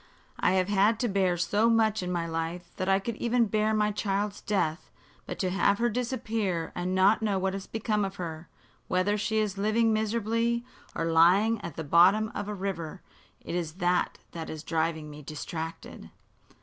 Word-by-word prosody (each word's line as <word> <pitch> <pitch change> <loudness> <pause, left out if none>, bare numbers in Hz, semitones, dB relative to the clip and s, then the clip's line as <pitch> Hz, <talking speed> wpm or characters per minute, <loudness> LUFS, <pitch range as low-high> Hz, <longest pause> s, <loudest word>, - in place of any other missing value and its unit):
I - - +3
have 185 -1 +2
had 205 +2 +3
to 245 - +1
bear 190 -4 +1
so 205 +6 +2
much 220 -2 +3
in 180 0 -3
my 170 -2 -1
life 165 +2 -4
that 185 +1 -1
I 195 - +5
could 215 +3 -4
even 235 0 +2
bear 215 +1 +1
my 210 -1 +2
child's 205 0 -2
death. 175 -6 -1 0.4
But - - -5
to 185 -2 -1
have 200 +1 +2
her 240 +2 +1
disappear 225 -7 -2
and 180 +1 -2
not 195 +4 +4
know 210 -3 +1
what 190 0 -1
has 195 -1 -6
become 215 -1 -1
of 195 0 -3
her 165 -3 -6 0.4
whether 185 +3 +1
she 220 +1 -1
is 205 -2 0
living 220 +2 +2
miserably 230 +2 0 0.3
or 165 - -1
lying 180 +7 +4
at 160 - -7
the 160 - -4
bottom 185 +8 +4
of 205 - -4
the 210 - -3
river 190 -3 -5 0.4
it - - -7
is 170 -3 -2
this 180 0 +2 0.3
that 165 -1 -6
is 155 -1 -6
driving 160 -1 -1
me 150 0 -10
distracted." 160 +2 -7
195 Hz, 190 wpm, -28 LUFS, 175-215 Hz, 0.4 s, I